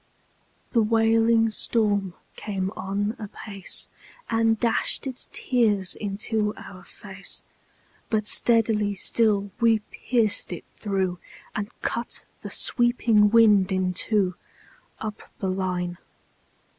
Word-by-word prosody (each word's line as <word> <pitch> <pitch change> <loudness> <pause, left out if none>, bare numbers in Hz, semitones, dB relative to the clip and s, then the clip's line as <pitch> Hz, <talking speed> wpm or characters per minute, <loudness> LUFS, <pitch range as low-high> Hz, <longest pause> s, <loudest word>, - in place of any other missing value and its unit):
The 230 - +3
wailing 225 +1 +3
storm 205 -4 0 0.2
came 195 -2 -3
on 200 +3 -2
apace, 200 -2 -4 0.4
And 225 -1 +2
dashed 235 +3 0
its 260 -2 +1
tears 210 -7 +1
into 210 +1 -2
our 185 -1 -11
fade; 190 +1 -10 0.8
But 215 -2 0
steadily 215 -4 +4
still 205 0 +2
we 230 -2 +4
pierced 220 -7 0
it 170 - -8
through, 190 -4 -2 0.4
And 210 -1 -3
cut 235 +1 -3 0.2
the - - -7
sweeping 235 -3 +3
wind 210 -4 +5
in 185 -1 0
two, 195 -1 +1 0.7
Up 215 -1 -6 0.2
the 190 - -2
line. 180 -2 -3
210 Hz, 105 wpm, -25 LUFS, 195-225 Hz, 0.8 s, wind